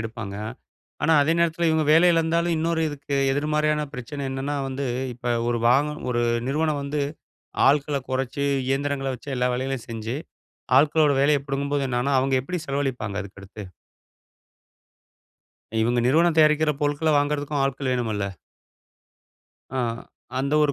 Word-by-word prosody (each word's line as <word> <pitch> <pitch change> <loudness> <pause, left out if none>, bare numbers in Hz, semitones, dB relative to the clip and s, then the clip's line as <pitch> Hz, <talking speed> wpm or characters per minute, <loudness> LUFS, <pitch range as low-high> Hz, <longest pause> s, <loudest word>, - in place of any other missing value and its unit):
எடுப்பாங்க. 110 -3 -6 0.7
ஆனா, 160 +2 +3
அதே 155 +3 +2
நேரத்தில 170 0 +1
இவங்க 160 -1 +2
வேலை 165 +3 +6
இழந்தாலும், 165 +1 +1
இன்னொரு 165 0 0
இதுக்கு 145 -1 -5 0.2
எதிர்மாறியான 150 +1 0
பிரச்சனை 135 +4 -6
என்னன்னா 135 +2 -3
வந்து, 135 +1 -3 0.3
இப்ப 120 0 -2 0.2
ஒரு 120 -1 0
வாக 140 +5 +3 0.2
ஒரு 120 -1 0 0.3
நிறுவனம் 150 0 0
வந்து 145 +1 -2 0.7
ஆள்க்கள 145 0 +2
கொறைச்சு 135 +2 -1 0.2
இயந்திரங்கள 135 0 -1
வச்சு 140 +3 -9
எல்லா 125 0 +1
வேலைகளையும் 130 -1 -3
செஞ்சு, 115 +2 -4 0.6
ஆள்க்களோட 150 0 +4
வேலைய 145 0 +3
பிடுங்கும்போது 140 0 -1
என்னாகும்ன்னா, 125 +3 +1
அவங்க 135 0 +1
எப்படி 180 +5 -4
செலவழிப்பாங்க 130 -8 -2
அதுக்கு 100 0 -12
அடுத்து? 100 +2 -10 2.2
இவங்க 120 +2 +2
நிறுவனம் 160 +4 +3
தயாரிக்கிற 155 0 +4
பொருட்கள 145 +2 +1
வாங்குறதுக்கும் 145 -1 -1
ஆட்கள் 135 -1 -2
வேணுமல்ல. 110 -5 -1 1.5
ஆ. 130 - -2 0.6
அந்த 140 +2 -1
ஒரு 145 - +2
140 Hz, 130 wpm, -24 LUFS, 130-150 Hz, 2.2 s, வேலை